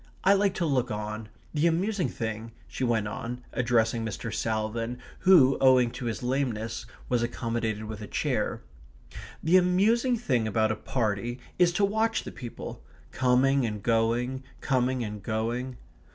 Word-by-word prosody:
I 195 - +6
like 200 -1 +2
to 175 - 0
look 130 -5 +1
on. 105 0 -4 0.2
The 155 +2 +3
amusing 185 +3 +1
thing," 110 0 -5
she - - -5
went 115 -4 +1
on, 120 +4 -5
addressing 115 -2 +1
Mr. 110 +1 -4
Salvin, 115 +2 -2 0.2
who, 150 -8 +6
owing 130 -3 +5
to 125 - -6
his 115 +1 -3
lameness, 120 -4 -2 0.2
was 125 -2 +1
accommodated 115 -2 -2
with 110 0 -6
a 105 - -6
chair, - - -1 0.8
"the 170 +4 +5
amusing 215 +8 +3
thing 125 - 0
about 110 0 +2
a - - 0
party 115 +1 -2 0.2
is 175 -1 +5
to 200 +3 +3
watch 220 +2 0
the - - -7
people 120 -3 -8 0.3
coming 130 +1 +3
and 105 -3 -3
going, 120 +3 +1 0.2
coming 130 -2 +1
and 105 -1 -5
going." 115 +4 -2
120 Hz, 150 wpm, -28 LUFS, 110-140 Hz, 0.8 s, I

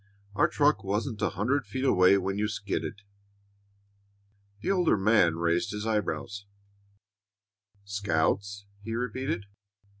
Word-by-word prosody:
Our 105 - +3
truck 145 0 +2
wasn't 105 +3 -2
a - - +2
hundred 125 +5 -1
feet 130 +6 -3
away 95 -5 +5
when 95 0 -2
you 105 - +1
skidded." 100 -1 -4 1.6
The - - 0
older 180 - +3
man 95 -4 +4
raised 85 +5 0
his 105 +1 -4
eyebrows. 105 -2 -2 1.4
"Scouts!" 100 0 -1 0.2
he 115 +2 -4
repeated. 125 -3 -2
105 Hz, 115 wpm, -28 LUFS, 100-115 Hz, 1.6 s, away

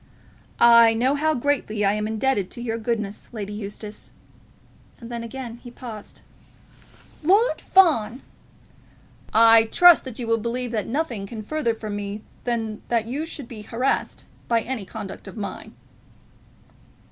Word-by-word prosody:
"I 235 -1 +7
know 255 +4 +2
how 310 +2 +1
greatly 240 -6 0
I 195 - +3
am 210 0 -2
indebted 220 -3 0
to 240 - -8
your 230 -1 -2
goodness, 215 -3 -3
Lady 210 -2 -5
Eustace 210 0 -8 0.5
" - - -30
And 235 0 -10
then 235 -1 -4
again 235 0 -7
he 245 - -12
paused. 230 -4 -10 1.0
"Lord 400 +10 +3
Fawn!" 270 - +3 1.1
"I 225 0 +7
trust 350 +5 +6
you 245 - -4
will 230 0 +1
believe 240 +2 -3
that 215 -3 -2
nothing 235 -7 -2
can 220 +1 -7
be 210 - -14
further 300 -7 0
from 215 -2 -5
me 205 +1 -5 0.2
than 225 -3 -2
that 230 -2 +1
you 285 +7 -3
should 285 -6 -7
be 225 -3 -9
harassed 245 +5 -2 0.2
by 230 -1 +2
any 230 -4 -4
conduct 205 +1 -8
of - - -10
mine." 205 - -6
230 Hz, 150 wpm, -23 LUFS, 215-255 Hz, 1.1 s, I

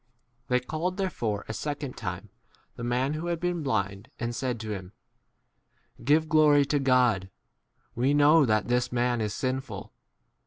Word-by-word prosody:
h - - -48 0.4
They 125 0 +3
called 160 +8 -3
therefore 115 - -2
a 110 - -4
second 145 +2 -4
time 95 0 -5 0.5
the 120 - -7
man 125 +4 0
who 160 +3 -4
had 170 -1 -1
been 175 -1 -1
blind, 100 -6 -2
and 120 0 -2
said 125 -1 -2
to 110 -1 -5
him, 95 -2 -6 1.1
Give 155 +5 +3
glory 150 -2 +5
to 145 +1 +1
God; 125 -8 +3 0.6
we" 120 - -1
25 145 - +3
know 150 +1 +6
that 110 -1 +1
this 125 0 +1
man 120 -1 +1
is 105 -1 -2
sinful. 130 -6 -4
125 Hz, 165 wpm, -27 LUFS, 110-150 Hz, 1.1 s, know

